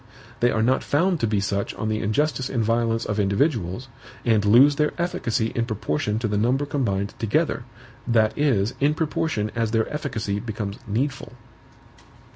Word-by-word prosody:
They 120 - +3
are 110 -2 +1
not 130 +3 +2
found 170 +4 +1
to 115 - +1
be 105 -1 +1
such 100 0 -2
on 110 - -3
the 110 0 0
injustice 130 +5 0
and 120 -4 0
violence 115 0 +1
of 105 0 -2
individuals, 105 - 0 0.4
and 110 -3 +3
lose 130 +8 +6
their 150 +1 0
efficacy 115 -10 -1
in 115 -1 -1
proportion 105 -2 -1
to 115 0 -1
the 105 -1 0
number 130 +6 +1
combined 105 -9 -1
together, 110 -3 0 0.4
that 110 -2 +3
is, 120 -8 +1
in 145 +2 +2
proportion 155 -9 -1
as 115 -1 0
their 110 0 +1
efficacy 110 -9 -2
becomes 105 -3 -5
needful. 135 +5 -2
115 Hz, 165 wpm, -24 LUFS, 105-135 Hz, 0.4 s, lose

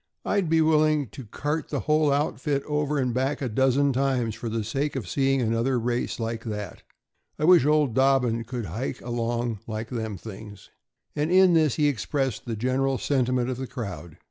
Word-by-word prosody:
"I'd 195 -5 +1
be 165 0 +4
willing 155 -4 +3
to 130 +1 -10
cart 150 +8 -3
the - - -2
whole 150 -1 +2
outfit 140 0 0
over 150 0 -1
and 125 -3 0
back 135 +3 0
a 135 - -2
dozen 135 +4 +2
times 130 -4 0
for 115 +2 -5
the 110 0 -2
sake 140 +7 -2
of 120 -9 -4
seeing 135 +3 +1
another 115 +3 +1
race 120 +1 -2
like 115 0 -3
that. 105 -2 -5 0.6
I - - -4
wish 175 -5 +6
old 150 -5 +3
Dobbin 130 -3 +2
could 120 -1 -4
hike 110 +10 -4
along 120 -1 -2
like 110 +1 -4
them 110 -5 -4
things." 105 -1 -11 0.4
And 150 +3 0
in 185 -1 +6
this 155 -5 +3
he 150 -2 +2
expressed 135 - -1
the 115 - -2
general 130 +4 0
sentiment 125 -2 0
of 125 - -4
the 130 0 -5
crowd. 90 - -7
130 Hz, 185 wpm, -25 LUFS, 115-145 Hz, 0.6 s, wish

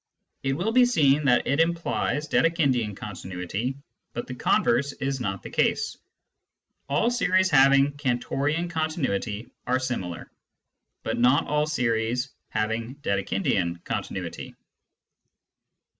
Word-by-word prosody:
It 135 0 0
will 175 +10 -1
be 250 +2 +6
seen 150 - +3
that 125 -3 +4
it 140 +3 +1
implies 165 -3 0
Dedekindian 135 - +1
con 105 - -6
tinuity, 95 +8 -4 0.4
but 120 - -4
the 125 - -7
converse 130 +2 +2
is 135 0 -3
not 95 -6 -3
the - - -7
case. - - +1 0.9
All 150 +12 +2
series 185 -5 +2
having 140 0 +6
Cantorian 145 +4 -1
continuity 135 - -2 0.2
are 130 +1 +3
similar, 120 -10 -4 0.7
but - - -2
not 125 +4 +4
all 150 +1 +1
series 125 -2 0 0.2
having 110 +3 -2
Dedekindian 95 -4 0
continuity. - - -5
135 Hz, 115 wpm, -26 LUFS, 115-150 Hz, 0.9 s, be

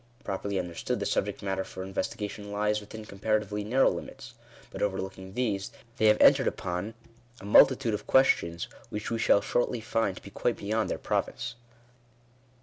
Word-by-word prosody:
Pro 95 -1 -3
perly 100 -1 -3
understood 90 -2 -3
the - - -2
subject - - -1
matter 95 -1 -1
for 95 0 -8
investigation 105 +1 -4
lies 105 +1 0
within 105 +1 -9
comparatively 105 0 -1
narrow 125 +6 +3
limits; - - -8 0.4
but, - - -7
overlooking 95 -1 -3
these, 105 -6 -1 0.3
they 110 - +4
have 105 0 +5
entered - - +6
upon 90 +5 -3 0.4
a - - -11
multitude 120 +3 +5
of 105 - -4
questions 85 -10 +3 0.2
which 105 +1 -5
we 115 - -1
shall 100 - +4
shortly 120 +3 0
find 110 -3 -1
to - - -11
be 100 - -11
quite 120 +4 -1
beyond 110 +2 -1
their - - -1
province. 115 - -2
105 Hz, 165 wpm, -28 LUFS, 95-110 Hz, 0.4 s, entered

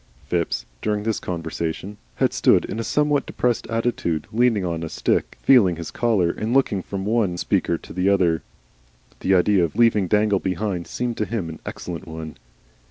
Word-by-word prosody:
Phipps, 85 -8 -1 0.2
during 105 -1 -1
this 110 0 -1
conversation, 85 +3 -4 0.2
had - - +1
stood - - +4
in 110 - -5
a - - -1
somewhat 145 +5 +1
depressed 120 -3 -1
attitude, 115 -9 -1
leaning 115 -4 +2
on 85 -2 -2
his 80 - -5
stick, - - 0
feeling 105 -10 +5
his 85 0 -7
collar, 105 -8 +2
and 110 +7 -2
looking 110 -8 +2
from 95 +1 -5
one 105 -5 +1
speaker 85 - 0
to - - -12
the 95 +2 +1
other. 90 -5 +2 0.8
The 95 - +2
idea 95 +1 +4
of 80 - -2
leaving 110 -5 +4
Dangle 105 0 +3
behind 95 -1 -2
seemed 120 -2 -3
to 105 - 0
him 105 -7 -3
an 80 - -8
excellent 90 +1 -6
one. 80 -1 -7
100 Hz, 175 wpm, -23 LUFS, 85-115 Hz, 0.8 s, feeling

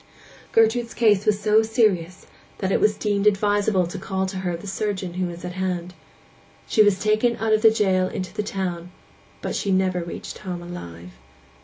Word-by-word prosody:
Gertrude's 230 +1 +2
case 210 -4 +3
was 210 -1 +3
so 215 +1 +4
serious 210 -6 0 0.3
that 190 -1 -2
it - - +2
was 210 0 +3
deemed 205 -1 0
advisable 205 -2 +2
to 175 - -6
call 190 -1 -2
to 190 0 -5
her 180 -2 -2
the 170 - -12
surgeon 195 -2 -3
who 185 0 -1
was 175 0 -8
at 180 - -4
hand. 180 -1 -3 0.7
She 220 - +3
was 205 -3 +4
taken 215 +3 +2
out 220 -1 +1
of 215 - +3
the 225 - +8
jail 190 -4 +2
into 185 0 -5
the 210 - -2
town; 180 -4 -4 0.5
but - - -3
she 200 - -2
never 185 -1 +1
reached 170 - -7
home 180 -2 -6
alive. 90 - -9
190 Hz, 185 wpm, -23 LUFS, 180-215 Hz, 0.7 s, the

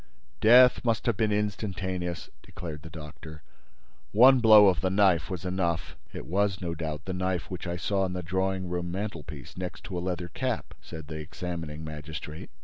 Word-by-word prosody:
"Death 125 +3 +7
must 115 -2 0
have 120 -4 +2
been 110 +1 +1
instantaneous," 95 -4 -2
declared 80 -4 -8
the 80 - -10
doctor. 75 -1 -10 0.7
"One 130 +5 +7
blow 110 -3 +8
of 95 - +2
the 95 - +1
knife 95 +1 +3
was 95 -1 -5
enough." 85 -3 -1 0.2
"It - - -7
was, 100 +2 0
no 85 -2 -3
doubt, 80 -1 -5
the 95 - -3
knife 90 -2 -2
which 90 0 -5
I 85 0 -3
saw 95 +3 0
on 95 -1 0
the 90 0 -4
drawing 95 +1 -1
room 90 0 -3
mantelpiece, 85 - -6
next 90 -1 -6
to 95 - -5
a - - -4
leather 90 -1 -3
cap?" 125 +6 -3
said 80 -2 -9
the 80 +1 -6
examining 80 -1 -6
magistrate. 75 0 -7
90 Hz, 180 wpm, -28 LUFS, 80-100 Hz, 0.7 s, blow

